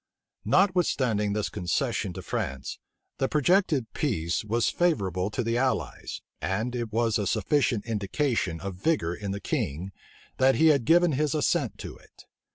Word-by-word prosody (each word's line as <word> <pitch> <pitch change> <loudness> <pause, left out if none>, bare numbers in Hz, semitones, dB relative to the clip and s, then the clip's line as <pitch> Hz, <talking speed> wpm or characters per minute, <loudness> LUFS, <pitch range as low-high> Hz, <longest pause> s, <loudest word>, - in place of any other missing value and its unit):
Notwithstanding 135 - +2
this 105 0 -1
concession 90 +2 -1
to 95 0 -7
France, 70 -4 -4 0.4
the 135 - +2
projected 155 - +2
peace 90 - -1
was 115 +2 +1
favorable 100 - 0
to 125 +4 -2
the 115 +1 0
allies, 130 0 -2 0.2
and 110 +6 -1
it 120 -3 -3
was 115 -1 +1
a 100 - -1
sufficient 135 -7 +1
indication 110 - -1
of 100 0 -4
vigor 150 - +1
in 100 +2 -5
the 100 +1 -3
king, 90 0 -3 0.5
that 130 0 +4
he 160 +1 +5
had 140 -6 +3
given 175 +3 +5
his 150 +2 0
assent 150 -4 0
to - - -8
it. - - -20
115 Hz, 155 wpm, -27 LUFS, 100-150 Hz, 0.5 s, he